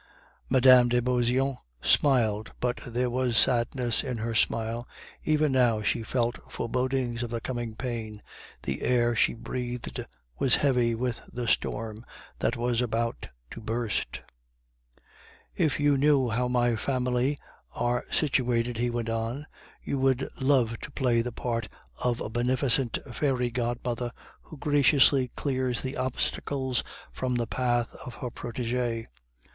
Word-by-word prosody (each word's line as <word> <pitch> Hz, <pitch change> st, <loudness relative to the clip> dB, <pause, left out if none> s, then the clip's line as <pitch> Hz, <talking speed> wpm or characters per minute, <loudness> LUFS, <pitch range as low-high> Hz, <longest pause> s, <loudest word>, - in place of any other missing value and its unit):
Mme. 125 Hz, -1 st, +7 dB
de 120 Hz, 0 st, +2 dB
Beauseant 125 Hz, +2 st, +1 dB, 0.2 s
smiled 110 Hz, -, +3 dB
but 125 Hz, 0 st, -1 dB
there 125 Hz, +1 st, 0 dB
was 125 Hz, -1 st, +1 dB
sadness 120 Hz, -1 st, +2 dB
in 125 Hz, -4 st, -3 dB
her 115 Hz, +1 st, -2 dB
smile; 115 Hz, +1 st, 0 dB, 0.4 s
even 155 Hz, -1 st, +2 dB
now 120 Hz, -5 st, +3 dB
she 105 Hz, -, +1 dB
felt 120 Hz, +1 st, -1 dB
forebodings 125 Hz, -1 st, -1 dB
of 120 Hz, -, -3 dB
the 115 Hz, 0 st, -2 dB
coming 120 Hz, -2 st, -4 dB
pain, 115 Hz, -4 st, -5 dB, 0.4 s
the 70 Hz, 0 st, -3 dB
air 120 Hz, -1 st, +2 dB
she 115 Hz, -, +3 dB
breathed 125 Hz, +1 st, -4 dB, 0.4 s
was 130 Hz, -, +5 dB
heavy 125 Hz, -5 st, +2 dB
with 120 Hz, 0 st, -2 dB
the 120 Hz, -1 st, -4 dB
storm 110 Hz, 0 st, -1 dB, 0.4 s
that 115 Hz, -, 0 dB
was 120 Hz, 0 st, +1 dB
about 115 Hz, -1 st, -1 dB, 0.2 s
to -, -, -8 dB
burst. 115 Hz, 0 st, -2 dB, 1.3 s
"If 155 Hz, -4 st, +1 dB
you 145 Hz, -1 st, +4 dB
knew 140 Hz, -3 st, +4 dB
how 120 Hz, +3 st, 0 dB
my 120 Hz, -1 st, +2 dB
family 125 Hz, +3 st, 0 dB, 0.4 s
are 120 Hz, 0 st, 0 dB
situated," 125 Hz, -5 st, +1 dB
he 120 Hz, +1 st, +1 dB
went 120 Hz, -1 st, -2 dB
on, 115 Hz, +5 st, -2 dB, 0.4 s
"you 140 Hz, -, -2 dB
would 130 Hz, 0 st, +2 dB
love 130 Hz, -4 st, +2 dB
to -, -, -8 dB
play 125 Hz, -5 st, +1 dB
the 120 Hz, +1 st, -3 dB
part 115 Hz, -2 st, -3 dB, 0.3 s
of 120 Hz, -1 st, +1 dB
a -, -, -2 dB
beneficent 125 Hz, +1 st, +1 dB
fairy 125 Hz, -2 st, 0 dB
godmother 120 Hz, 0 st, -2 dB, 0.3 s
who 155 Hz, -, -12 dB
graciously 140 Hz, -2 st, +4 dB
clears 130 Hz, -3 st, -1 dB
the 130 Hz, +1 st, -3 dB
obstacles 130 Hz, 0 st, -1 dB, 0.3 s
from 125 Hz, -1 st, -1 dB
the 120 Hz, -1 st, 0 dB
path 120 Hz, 0 st, 0 dB
of 125 Hz, -, -8 dB
her 125 Hz, -, -5 dB
protege." 120 Hz, -1 st, -3 dB
125 Hz, 140 wpm, -28 LUFS, 115-130 Hz, 1.3 s, Mme